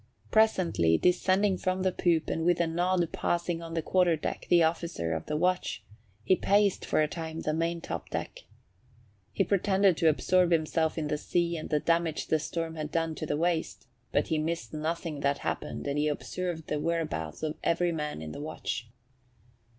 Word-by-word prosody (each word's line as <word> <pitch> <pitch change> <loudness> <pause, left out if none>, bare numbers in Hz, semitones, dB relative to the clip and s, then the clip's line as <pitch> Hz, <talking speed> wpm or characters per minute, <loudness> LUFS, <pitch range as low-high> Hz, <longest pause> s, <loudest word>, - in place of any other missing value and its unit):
Presently 175 - +3
descending 185 +2 +2
from 185 0 -1
the 190 - +2
poop 170 -3 +1
and 160 - -1
with 175 0 +3
a 170 - +3
nod 175 +1 +1
passing 175 -2 -1
on 165 0 -7
the 165 - -1
quarter 180 -2 +3
deck 155 - -5
the 170 -1 +6
officer 160 - -1
of 80 -1 -4
the 150 - -1
watch, 180 +3 0 0.4
he 185 - +4
paced 200 +1 +2
for 155 - +3
a - - +1
time 160 0 -5
the 155 - -1
maintop 165 +1 -3
deck. - - -5 0.9
He - - +1
pretended 195 -2 +3
to 165 -2 +4
absorb 180 +3 +3
himself 160 -1 +1
in 155 -2 -1
the 150 0 -1
sea 170 +1 0
and 155 - -5
the 150 - +2
damage 165 0 0
the 160 - +3
storm 165 +1 -3
had 155 -1 -3
done 165 0 0
to 155 - -5
the 145 - 0
waist; 170 0 -1 0.3
but - - +1
he 160 - +1
missed 155 -8 -3
nothing 155 0 -3
that 140 0 +1
happened - - -4
and 145 +1 -1
he 150 - +2
observed 165 +2 -3
the 150 - -2
whereabouts 155 - -2
of 155 -1 -1
every 175 +1 +2
man 150 - -4
in 75 - -6
the 145 - -7
watch. 150 -5 -4
165 Hz, 190 wpm, -29 LUFS, 155-175 Hz, 0.9 s, the